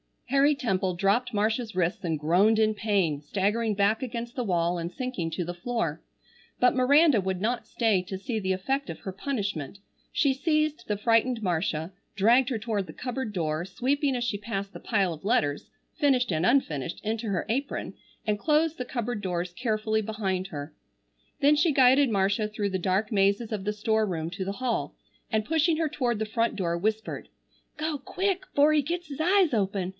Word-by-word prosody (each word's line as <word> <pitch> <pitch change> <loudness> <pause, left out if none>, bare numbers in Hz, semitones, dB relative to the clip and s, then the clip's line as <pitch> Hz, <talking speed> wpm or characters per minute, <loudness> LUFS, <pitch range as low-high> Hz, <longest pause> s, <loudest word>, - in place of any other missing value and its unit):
Harry 280 +2 +4
Temple 190 -9 -1
dropped 205 +7 +1
Marcia's 220 +1 0
wrists 185 +3 0
and 160 -2 0
groaned 180 +9 +3
in 215 0 +3
pain, 200 -8 0
staggering 210 +7 0
back 205 +4 +2
against 240 -2 -4
the 250 -3 -3
wall 175 -2 +1
and 170 0 -3
sinking 225 -5 -3
to 175 +2 -3
the 175 +1 -4
floor. 230 +7 -2 0.6
But 250 - +4
Miranda 280 +1 +5
would 190 -1 -2
not 235 +3 -1
stay 220 -6 +2
to 190 +1 -6
see 220 +4 -3
the 190 -2 0
effect 270 +9 -2
of - - -6
her 195 - -6
punishment. 200 - -4 0.3
She 285 -5 +3
seized 305 -2 0
the 210 - -1
frightened 230 +2 +2
Marcia, 165 -2 -1 0.2
dragged 235 +5 +4
her 245 - -1
toward 210 -4 -2
the - - -9
cupboard 250 -3 -4
door, 160 -2 -1
sweeping 270 +8 0
as 245 - -1
she 230 -4 -1
passed 200 -1 -4
the - - -9
pile 195 -6 0
of 155 +3 -12
letters, 145 -9 +1 0.3
finished 265 -7 +3
and 160 +1 +1
unfinished, 165 - +1
into 220 +1 -2
her 195 -3 -1
apron, 275 +5 -2 0.3
and 210 -1 0
closed 310 +3 +2
the 250 - -4
cupboard 240 -3 -3
doors 180 -2 -2
carefully 220 0 0
behind 195 -3 -2
her. 145 -3 -7 0.7
Then 290 +1 +5
she 305 +1 +3
guided 265 +1 +5
Marcia 205 +1 +1
through 210 -1 -2
the 190 -1 -2
dark 190 +5 0
mazes 200 +2 +2
of 205 -3 -3
the 210 - 0
store 220 +1 +1
room 165 -3 -3
to 190 +1 -4
the 195 - -2
hall, 245 +1 -2 0.3
and 220 -2 +1
pushing 320 +3 +2
her 315 -1 0
toward 245 -7 -1
the 220 - 0
front 230 +2 0
door, 170 -4 -1
whispered: 215 +4 -2 0.5
"Go 310 0 -2
quick 375 +7 -2
'fore 290 +2 +5
he 305 -1 +4
gets 345 +4 -4
his 280 - -7
eyes 360 -1 +3
open. 195 -3 0
215 Hz, 190 wpm, -27 LUFS, 190-255 Hz, 0.7 s, Miranda